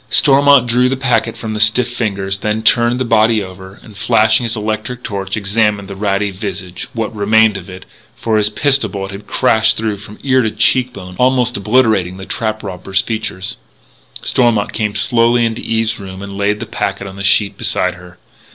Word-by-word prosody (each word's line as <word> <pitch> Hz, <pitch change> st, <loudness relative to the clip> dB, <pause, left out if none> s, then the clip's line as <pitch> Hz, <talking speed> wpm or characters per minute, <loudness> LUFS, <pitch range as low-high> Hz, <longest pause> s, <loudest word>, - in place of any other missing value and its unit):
Stormont 140 Hz, -1 st, +6 dB
drew 125 Hz, +1 st, +2 dB
the 135 Hz, -, -2 dB
packet 125 Hz, -3 st, 0 dB
from 110 Hz, -1 st, -5 dB
the 105 Hz, -, -4 dB
stiff 110 Hz, +3 st, +3 dB
fingers, 100 Hz, -5 st, -2 dB
then 105 Hz, +2 st, -2 dB
turned 120 Hz, +2 st, +3 dB
the 130 Hz, -, -1 dB
body 110 Hz, -1 st, +2 dB
over, 95 Hz, +1 st, -11 dB
and, 110 Hz, -, -15 dB
flashing 110 Hz, +2 st, +2 dB
his 115 Hz, -, 0 dB
electric 110 Hz, +3 st, -4 dB
torch, 100 Hz, -2 st, -4 dB
examined 105 Hz, 0 st, 0 dB
the 100 Hz, -, -8 dB
ratty 100 Hz, 0 st, -1 dB
visage 95 Hz, -2 st, -6 dB
what 115 Hz, -1 st, -4 dB
remained 110 Hz, +1 st, +3 dB
of 95 Hz, -1 st, -8 dB
it 95 Hz, 0 st, -10 dB, 0.3 s
for 110 Hz, -2 st, 0 dB
his 105 Hz, 0 st, +3 dB
pistol 135 Hz, +5 st, +2 dB
bullet 95 Hz, -1 st, -6 dB
had 100 Hz, +1 st, -10 dB
crashed 110 Hz, 0 st, +2 dB
through 110 Hz, -2 st, -2 dB
from 105 Hz, +1 st, -12 dB
ear 130 Hz, -1 st, +3 dB
to 110 Hz, -, 0 dB
cheek 120 Hz, +4 st, +2 dB
bone, 90 Hz, -4 st, -10 dB
almost 125 Hz, -1 st, +2 dB
obliterating 105 Hz, -4 st, +1 dB
the 95 Hz, -, -8 dB
trap 110 Hz, 0 st, -3 dB
robber's 95 Hz, 0 st, -1 dB
features. 110 Hz, -3 st, -4 dB, 0.7 s
Stormont 115 Hz, -5 st, +1 dB
came 105 Hz, -2 st, -2 dB
slowly 120 Hz, +2 st, +3 dB
into 115 Hz, 0 st, -3 dB
Eve's 115 Hz, 0 st, -1 dB
room 95 Hz, -1 st, -9 dB
and 100 Hz, 0 st, -8 dB
laid 100 Hz, +1 st, -1 dB
the 120 Hz, -, -5 dB
packet 100 Hz, -2 st, -4 dB
on 95 Hz, -1 st, -9 dB
the 100 Hz, -, -7 dB
sheet 105 Hz, +1 st, +3 dB
beside -, -, 0 dB
her. 90 Hz, 0 st, -15 dB
110 Hz, 190 wpm, -15 LUFS, 100-115 Hz, 0.7 s, Stormont